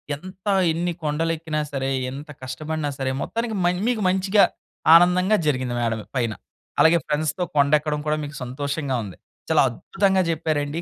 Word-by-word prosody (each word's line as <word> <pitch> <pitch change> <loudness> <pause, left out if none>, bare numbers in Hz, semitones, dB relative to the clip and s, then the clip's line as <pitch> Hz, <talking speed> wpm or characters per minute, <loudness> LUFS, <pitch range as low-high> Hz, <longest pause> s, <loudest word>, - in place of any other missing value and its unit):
ఎంత 185 +6 -12 0.2
ఎన్ని 175 +2 -1
కొండలు 155 +2 0
ఎక్కినా 155 -1 -3
సరే, 135 -1 -2 0.2
ఎంత 145 +3 -8
కష్టపడినా 150 +3 -3
సరే, 130 -1 -1
మొత్తానికి 230 -1 -3
మన్ 180 +1 +1
మీకు 240 -3 0
మంచిగా 190 +2 +3 0.5
ఆనందంగా 180 +4 +5
జరిగింది 130 -3 0
మేడలో 115 -2 -1
పైన. 115 -4 0 0.5
అలాగే 165 +1 +6
ఫ్రెండ్స్‌తో 155 +4 -1
కొండెక్కడం 150 +1 +2
కూడా 150 0 +1
మీకు 145 +1 -7
సంతోషంగా 140 +1 -2
ఉంది. 95 -4 -9 0.3
చాలా - - +5
అద్భుతంగా 190 -2 +1
చెప్పారండి. 155 -1 -1
155 Hz, 145 wpm, -23 LUFS, 140-180 Hz, 0.5 s, అలాగే